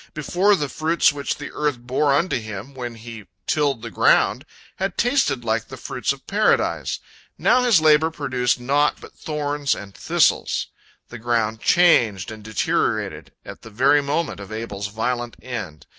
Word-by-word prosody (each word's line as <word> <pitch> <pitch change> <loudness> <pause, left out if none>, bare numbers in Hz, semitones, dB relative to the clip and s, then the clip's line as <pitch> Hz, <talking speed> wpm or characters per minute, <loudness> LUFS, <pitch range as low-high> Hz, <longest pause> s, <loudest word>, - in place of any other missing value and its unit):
Before, 180 +7 +2
the 150 -6 -2
fruits 160 +2 +2
which 140 -1 -3
the 145 - -7
earth 150 -3 -1
bore 130 +4 0
unto 145 0 +1
him 110 +3 -8
when 120 -3 -6
he 115 -2 -10 0.2
tilled 140 -6 0
the - - -6
ground - - +3 0.3
had 190 -1 -3
tasted 245 - +1
like 110 0 -1
the 130 - -9
fruits 125 - -2
of 140 -1 -8
Paradise. 210 +2 +1 0.4
Now 250 - +3
his 240 -8 +5
labor 155 0 +4
produced 130 -6 -1
naught 140 +4 +1
but - - -13
thorns 145 -2 -2
and 100 -1 -10
thistles. - - +1 0.4
The 120 - -9
ground 110 -2 0
changed 120 - +3
and 110 -1 -10
deteriorated 110 -1 -1
at - - -10
the 110 - -11
very 135 +7 +3
moment 145 -2 -2
of 100 +1 -9
Abel's 105 -2 -5
violent 120 +3 -3
end. 105 -12 -7
130 Hz, 160 wpm, -22 LUFS, 115-150 Hz, 0.4 s, his